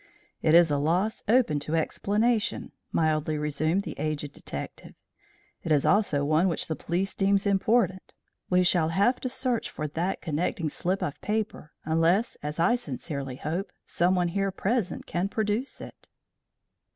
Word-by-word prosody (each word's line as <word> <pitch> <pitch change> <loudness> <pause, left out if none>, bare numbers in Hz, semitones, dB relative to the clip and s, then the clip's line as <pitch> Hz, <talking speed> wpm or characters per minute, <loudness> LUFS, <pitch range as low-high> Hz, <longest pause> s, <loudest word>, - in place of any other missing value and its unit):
"It 155 - +4
is 170 -2 +6
a 145 - +2
loss 180 +9 0
open 220 - +3
to 150 +3 -3
explanation," 210 +7 0 0.2
mildly 155 -1 +1
resumed 155 +5 0
the - - -5
aged 150 -2 -3
detective. - - -8 0.7
"It 165 - -4
is 145 -2 +3
also 175 -9 +3
one 155 +5 +3
which 170 - -1
the 160 - -2
police 180 +5 -2
deems 195 0 +2
important. 200 0 +1 0.3
We 180 0 +4
shall 175 -3 +3
have 200 +9 +2
to 255 - -3
search 250 -2 -1
for 155 - -4
that 170 +6 -2
connecting 160 0 -1
slip 185 +6 -2
of 145 - -4
paper 210 -7 -3
unless, 165 +8 +2
as 150 +2 -5
I 215 +9 +4
sincerely 140 - -5
hope, 175 +8 -3
someone 175 0 +1
here 195 +2 0
present 195 +1 -1
can 180 +3 -1
produce 220 +5 -2
it." - - -12
175 Hz, 150 wpm, -27 LUFS, 155-200 Hz, 0.7 s, is